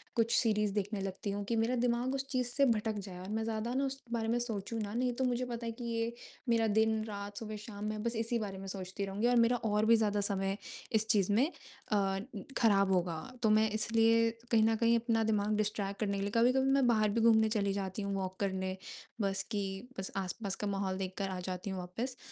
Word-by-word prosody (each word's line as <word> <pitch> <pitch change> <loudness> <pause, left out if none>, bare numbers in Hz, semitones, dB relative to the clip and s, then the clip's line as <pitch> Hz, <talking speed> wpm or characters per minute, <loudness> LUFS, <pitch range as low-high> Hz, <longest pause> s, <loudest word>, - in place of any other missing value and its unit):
कुछ 230 -1 +2
सीरीज़ 210 -3 +2
देखने 205 0 -2
लगती 195 +1 -3
हूँ 205 +1 -3
कि 235 - +1
मेरा 225 +3 +1
दिमाग 245 +2 +1
उस 270 0 -2
चीज़ 255 -2 +1
से 275 +3 +4
भटक 220 -3 +1
जाए 190 -2 -8
और 185 +2 -8
मैं 220 +1 -1
ज़्यादा 225 +1 -2
ना 270 +2 +1
उस 270 0 -4
बारे 230 -1 -1
में 230 +2 +2
सोचूँ 225 -2 -3
ना, 205 -1 -4
नहीं 250 +1 0
तो - - +2
मुझे 250 0 0
पता 235 -1 -5
है 230 - -2
कि 235 +2 -9
ये 230 0 -1 0.4
मेरा 230 -1 +3
दिन, 220 +1 +2
रात, 200 0 -6
सुबह, 215 -1 -5
शाम 210 -1 -7
मैं 215 0 -3
बस 235 0 0
इसी 230 +1 0
बारे 200 -3 -4
में 195 0 -7
सोचती 190 +1 -4
रहूँगी 200 +4 0
और 245 - +3
मेरा 235 +1 +4
और 215 -2 +1
भी 230 +1 +6
ज़्यादा 210 -2 +1
समय 195 -1 0 0.3
इस 220 -1 +2
चीज़ 205 -3 +3
में 235 +6 +4 0.5
अ, 195 -2 +2 0.4
खराब 200 -4 +4
होगा। 175 -3 +1 0.2
तो 220 - +4
मैं 215 +1 +4
इसलिए 230 +1 +4 0.2
कहीं 225 -2 +5
न 225 0 +3
कहीं 230 +1 +3
अपना 225 -1 +1
दिमाग 210 -1 +1
डिस्ट्रैक्ट 205 -2 -1
करने 200 -2 0
के - - -2
लिए 200 - -2
कभी-कभी 260 +3 +4
मैं 275 -1 +4
बाहर 215 -3 +3
भी 225 +3 0
घूमने 220 -1 +5
चली 200 -3 +1
जाती 195 0 -3
हूँ 200 0 -2
वॉक 190 -1 -4
करने, 190 -1 -1 0.4
बस 195 -1 0
कि 205 -2 0 0.4
बस 190 - -3
आस-पास 195 +1 -2
का - - 0
माहौल 195 -1 -1
देखकर 195 +1 -3
आ 185 -1 -4
जाती 180 +1 -4
हूँ 190 -1 -3
वापस, 225 +9 -4
215 Hz, 230 wpm, -33 LUFS, 195-230 Hz, 0.5 s, भी